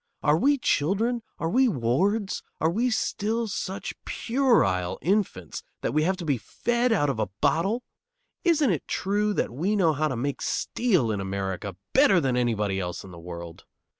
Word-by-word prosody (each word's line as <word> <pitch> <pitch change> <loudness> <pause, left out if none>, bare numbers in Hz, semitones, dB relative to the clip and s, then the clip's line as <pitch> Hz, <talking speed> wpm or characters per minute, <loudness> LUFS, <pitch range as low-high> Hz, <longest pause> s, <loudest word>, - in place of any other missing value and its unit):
Are 150 0 +4
we 280 - +3
children, 230 - +1 0.2
are 165 - -2
we 260 +3 +4
wards, 190 - 0 0.2
are 160 - +2
we 235 +7 +1
still 225 0 -1
such 195 -1 -4
puerile 225 - +1
infants 175 - -1 0.2
that 115 - -1
we 155 - +3
have 190 +1 +1
to 175 - -6
be 140 -5 +1
fed 240 - 0
out 170 -10 +3
of 115 - -5
a 105 -3 0
bottle? 200 +9 +1 0.6
Isn't 315 - +3
it 165 - -2
true 205 +2 0
that - - 0
we 180 - 0
know 170 -6 +3
how 155 +1 0
to 130 - -2
make 140 +4 -2
steel 185 - +1
in 100 -2 -2
America 95 0 -3 0.2
better 270 -9 +6
than 135 -5 0
anybody 105 -5 0
else 90 -2 -4
in 95 - -11
the 85 - -10
world? 85 -1 -9
165 Hz, 175 wpm, -26 LUFS, -, 0.6 s, better